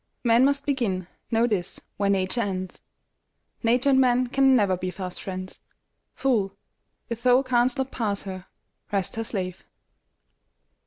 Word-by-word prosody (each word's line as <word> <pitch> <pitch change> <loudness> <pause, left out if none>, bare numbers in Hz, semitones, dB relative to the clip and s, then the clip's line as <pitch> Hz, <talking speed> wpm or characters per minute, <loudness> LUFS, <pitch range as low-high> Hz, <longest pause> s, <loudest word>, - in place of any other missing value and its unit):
Man 235 +1 +5
must 280 0 +2
begin, 225 -10 -1 0.2
know 230 +1 +3
this, 195 -6 -2 0.2
where 200 -1 +1
Nature 195 +4 +1
ends; 185 -3 -4 0.8
Nature 245 +4 +3
and 265 0 +5
man 250 0 +3
can 265 +1 +4
never 200 -6 +3
be 185 +1 -4
fast 180 -1 -6
friends. 185 -1 -6 0.6
Fool, 215 -8 0 0.5
if 235 0 -4
thou 250 +2 +4
canst 250 -1 +2
not 265 0 -2
pass 205 -4 -1
her, 190 -2 -7 0.4
rest 195 -1 -1
her 225 - -2
slave! 185 -5 -4
225 Hz, 145 wpm, -25 LUFS, 190-250 Hz, 0.8 s, Man